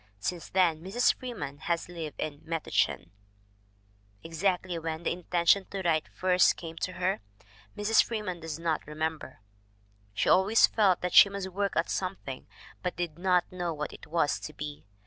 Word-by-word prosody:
Since 170 - -4
then 175 -4 +2
Mrs. 200 +8 +2
Freeman 205 - -6
has 170 +1 -1
lived 165 -4 -7
in 150 -1 -4
Metuchen. 165 0 -1 1.1
Exactly 180 +1 -1
when 160 0 -4
the - - 0
intention 175 +2 +2
to 195 -1 -5
write 160 -3 +1
first 185 -1 +3
came 165 -1 -8
to 185 - -3
her, 185 +2 0 0.6
Mrs. 215 +2 +4
Freeman 210 -6 -4
does 160 -2 -5
not 165 -3 -2
remember. 155 -6 -4 0.7
She - - 0
always 200 +5 +6
felt 195 -5 +2
that 180 - -2
she 200 - +9
must 200 -1 -4
work 200 +1 -1
at 165 - +1
something, 180 -8 -4 0.3
but 180 -1 -2
did 170 -2 -4
not 180 -1 +2
know 175 -3 -3
what 150 0 -4
it - - -12
was 160 -2 +1
to 155 - -8
be. 150 -6 -7
175 Hz, 165 wpm, -29 LUFS, 160-190 Hz, 1.1 s, she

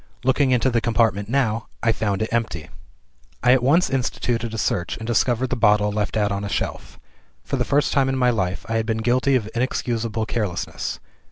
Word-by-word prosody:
Looking 130 +1 +3
into 125 +1 +2
the 115 -1 +1
compartment 110 -3 +1
now, 115 -4 0 0.2
I 115 - +4
found 105 -2 -1
it 110 - -4
empty. 110 -9 -2 0.7
"I 125 - +5
at 130 - +3
once 150 +8 +4
instituted 120 -3 -1
a 115 - -5
search, 90 -4 -1
and 110 - -7
discovered 120 +2 +1
the - - +1
bottle 105 -2 +3
left 105 +1 -2
out 105 -1 +1
on 100 0 -2
a 100 - -4
shelf. - - -4 0.5
For - - -3
the - - 0
first 145 +1 +1
time 135 -1 +3
in 135 - -1
my 125 -1 +3
life, 95 -5 -2
I 115 0 0
had 110 0 -1
been 110 -1 0
guilty 130 +3 +3
of 115 -5 0
inexcusable 115 -2 -1
carelessness. 105 -6 -3
115 Hz, 200 wpm, -22 LUFS, 105-125 Hz, 0.7 s, I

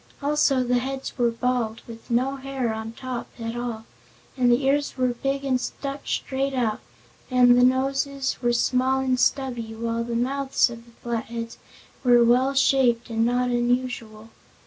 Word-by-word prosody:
Also 285 -2 +2
the 245 0 +1
heads 270 +1 -5
were 240 -3 +2
bald, 230 -1 -2
with 230 +1 -12
no 255 +3 +1
hair 265 -4 -3
on 220 0 -5
top 250 +1 -6
at 230 0 -5
all, 235 -2 -4 0.5
and 250 -2 +3
the 250 +3 +2
ears 285 +1 +1
were 255 -1 +2
big 275 +3 -2
and 255 -2 +1
stuck 275 +2 -6
straight 270 0 -2
out, 230 -4 0 0.5
and 250 -1 +6
the 245 - +5
noses 270 +1 +1
were 240 -1 +2
small 255 +2 +2
and 255 -1 0
stubby, 245 -4 0
while 230 +1 -2
the 235 0 -4
mouths 265 +1 +1
of 230 0 -10
the - - -17
Flatheads 230 0 -4 0.4
were 245 -2 +6
well 255 +4 +3
shaped 255 -3 +2
and 225 0 +1
not 245 +1 +1
unusual. 240 -3 -2
250 Hz, 165 wpm, -24 LUFS, 235-265 Hz, 0.5 s, and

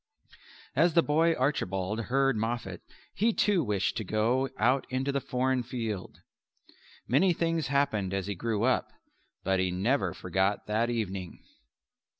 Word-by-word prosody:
As 170 -1 +3
the 170 - +6
boy 165 +3 +3
Archibald 105 -5 -1
heard 135 +1 +2
Moffat 115 +2 -3 0.3
he 225 +3 +2
too 200 -6 +2
wished 105 -5 -1
to 110 - -2
go 115 +6 +1
out 130 +4 +2
into 130 +2 -1
the 140 0 -1
foreign 130 0 0
field. 115 -5 -5 0.9
Many 170 +9 +4
things 165 -1 0
happened 135 -9 +1
as 95 -1 -2
he 100 - -2
grew 110 +2 -2
up; 130 0 +2 0.5
but 95 -1 +1
he 95 0 +1
never 95 +1 0
forgot 95 +3 0
that 110 +3 0
evening. 100 -6 -4
120 Hz, 145 wpm, -29 LUFS, 100-140 Hz, 0.9 s, the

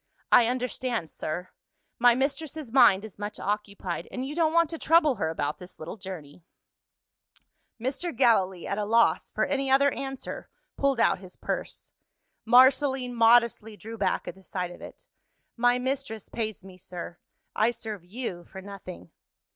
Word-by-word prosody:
"I 240 -2 +7
understand, 245 -6 -2
sir: 175 +4 -4 0.5
my 240 0 +6
mistress's 280 0 -3
mind 225 -6 +6
is 210 -2 -12
much 205 0 -5
occupied 200 -4 -3
and 255 0 -4
you 280 - -5
don't 320 -1 +2
want 335 -1 +3
to 330 - -5
trouble 310 -5 +4
her 160 - 0
about 150 -2 -3
this 180 0 -11
little 160 +5 -7
journey." 180 -6 -9 1.4
Mr. 270 +9 -2
Gallilee, 195 -8 +3
at 200 - -2
a 210 - -1
loss 220 -6 +3
for 215 - 0
any 275 -1 -1
other 280 +1 +5
answer, 270 -1 -6 0.3
pulled 275 -3 +1
out - - +3
his 185 -1 -12
purse. - - -5 0.5
Marceline 260 +1 +4
modestly 230 -2 +4
drew 225 +2 -8
back 195 -4 -1
at - - -4
the 190 - -18
sight 180 -1 -4
of - - -12
it. - - -11 0.5
"My 245 +1 +3
mistress 260 -3 -3
pays 220 -4 -4
me, 185 -1 -13
sir; 175 -1 -8 0.4
I 220 +2 +3
serve 220 -5 -6
you 185 -2 -5
for 190 - -10
nothing." 190 - -10
225 Hz, 160 wpm, -27 LUFS, 190-260 Hz, 1.4 s, I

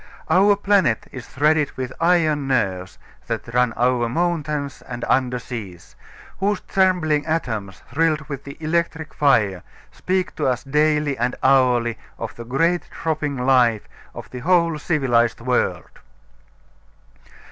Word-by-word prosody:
Our 200 +4 +5
planet 200 - +2
is 130 - -9
threaded 150 +2 +1
with 130 -1 -4
iron 160 -5 +2
nerves 95 -8 -1 0.3
that 115 0 -4
run 125 -1 +3
over 120 0 +1
mountains 150 -2 -2
and 120 -1 -6
under 125 -1 +1
seas, 110 -8 -8 0.4
whose 200 +1 0
trembling 175 -6 +1
atoms, 110 - -3
thrilled 155 +2 +1
with 140 -2 -7
the 140 0 -10
electric 160 0 -2
fire, 105 - +2 0.3
speak 185 0 -2
to - - 0
us 125 -1 0
daily 150 0 +1
and 120 +2 0
hourly 125 -4 +3 0.2
of 115 - -6
the 115 - -9
great 165 +8 +1
throbbing 150 -3 -3
life 120 -5 +3 0.3
of - - -8
the 125 - -6
whole 170 +1 +2
civilized 125 -8 +1
world. 125 +1 -2
140 Hz, 130 wpm, -21 LUFS, 120-160 Hz, 0.4 s, Our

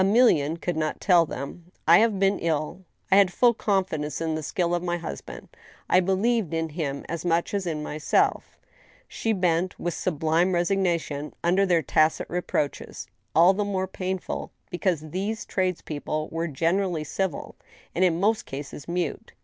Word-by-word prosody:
Emilienne 190 - +4
could 175 0 -2
not 155 -1 -2
tell 175 -4 +4
them: 140 +6 -7
'• - - -25 0.2
I 170 +2 +8
have 220 -2 +3
been 195 +1 +2
ill; 165 +2 -2 0.3
I 195 - +7
had 195 -3 +5
full 240 +6 +4
confidence 185 -9 -1
in 165 -1 -1
the 155 - -2
skill 170 +4 -1
of 175 - +1
my 175 -1 -1
hus 165 - -6
band; - - -10 0.4
I 185 - +5
believed 195 0 +1
in 165 0 -1
him 145 -3 -4
as 170 -1 -4
much 170 +1 0
as 195 -3 -1
in 155 -2 -2
myself 150 0 0 0.2
— - - -29
" - - -31
She 225 - 0
bent, 180 -2 0
with 175 - -2
sublime 165 +2 +1
resignation, 175 -5 0
under 185 +3 +3
their 170 -3 +3
tacit 155 0 +2
reproaches, 175 -4 -2 0.3
all 175 +4 +7
the 205 +2 -1
more 195 -2 -1
painful 185 0 -4 0.2
because 170 -4 -1
these 205 +5 -3
trades 185 -2 -1
people 155 0 -3
were 165 +1 -2
generally 170 +2 0
civU 180 +1 -3 0.4
and 180 - +1
in 170 -2 +3
most 215 +3 +1
cases 140 +1 -7
mute. 170 -3 -3
175 Hz, 175 wpm, -26 LUFS, 155-190 Hz, 0.4 s, I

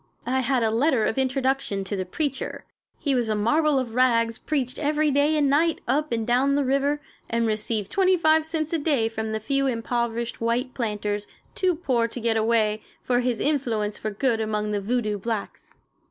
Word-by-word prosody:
I 260 +2 +1
had 255 -1 +1
a 220 - +2
letter 245 -1 +2
of 225 - 0
introduction 265 -5 0
to 195 +2 -4
the 185 -1 -3
"preacher." 280 - -3 0.3
He 280 - 0
was 240 -3 0
a 215 - +1
marvel 295 +8 +2
of 250 -4 -2
rags, 230 -2 +2
preached 260 -5 -2
every 300 0 +1
day 290 +3 +3
and 290 -2 +3
night, 315 +4 +2
up 295 +4 0
and 225 -1 -1
down 260 +4 +2
the 285 -1 +1
river, 275 +2 +1 0.3
and 230 0 +1
received 215 -1 -1
25 335 -5 +3
cents 320 0 -2
a 330 - +1
day 285 -7 +1
from 220 -1 -4
the 220 - -1
few 275 +4 0
impoverished 235 -1 -2
white 240 +2 0
planters, 210 -3 -2 0.3
too 370 -2 +1
poor 255 -8 0
to 235 - -7
get 230 -1 +1
away, 220 -1 +2 0.2
for 245 -1 +1
his 245 -3 0
influence 230 -8 0
for 215 - -3
good 225 +2 0
among 210 -1 -1
the 205 -1 -1
voodoo 215 -1 -1
blacks. 220 0 -5
245 Hz, 190 wpm, -25 LUFS, 220-280 Hz, 0.3 s, day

